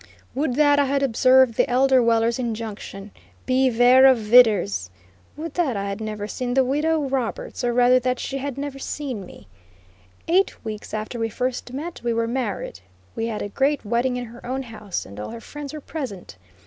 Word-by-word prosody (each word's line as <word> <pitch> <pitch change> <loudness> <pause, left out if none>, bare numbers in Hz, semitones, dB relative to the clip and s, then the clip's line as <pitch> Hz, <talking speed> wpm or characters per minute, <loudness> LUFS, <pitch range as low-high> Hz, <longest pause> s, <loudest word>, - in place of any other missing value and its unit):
Would 270 -2 -1
that 290 0 +4
I 285 - +4
had 275 +1 0
observed 255 0 +4
the - - +2
elder 260 +1 +4
Weller's 230 +1 +2
injunction: 215 -4 -5 0.3
"Bevare 255 0 +5
of 260 - +4
vidders;" 210 - +4 0.5
would 315 0 -6
that 290 - 0
I 200 0 -3
had 200 +2 -4
never 210 -1 -4
seen 245 +3 -3
the 265 - +5
Widow 300 +4 +1
Roberts, 260 -2 -3
or 240 - +1
rather 245 +1 +5
that 255 0 -1
she 275 - -4
had 275 -1 -5
never 280 -1 -5
seen 260 -9 -5
me. 105 - -15 0.8
Eight 370 -6 +1
weeks 215 0 -6
after 215 +3 -5
we 225 0 -1
first 250 +2 -3
met 315 +6 -6
we 235 -1 0
were 230 0 0
married. 235 - -3 0.4
We 225 0 -2
had 220 -2 -3
a 205 - -5
great 275 +4 0
wedding 240 +3 0
in 245 - -4
her 235 +1 -13
own 260 +2 -3
house, 215 -5 -6
and 100 +1 -11
all 105 - -5
her 230 - -7
friends 290 +3 -8
were 305 - -7
present. 255 - -7
245 Hz, 190 wpm, -23 LUFS, 225-270 Hz, 0.8 s, Bevare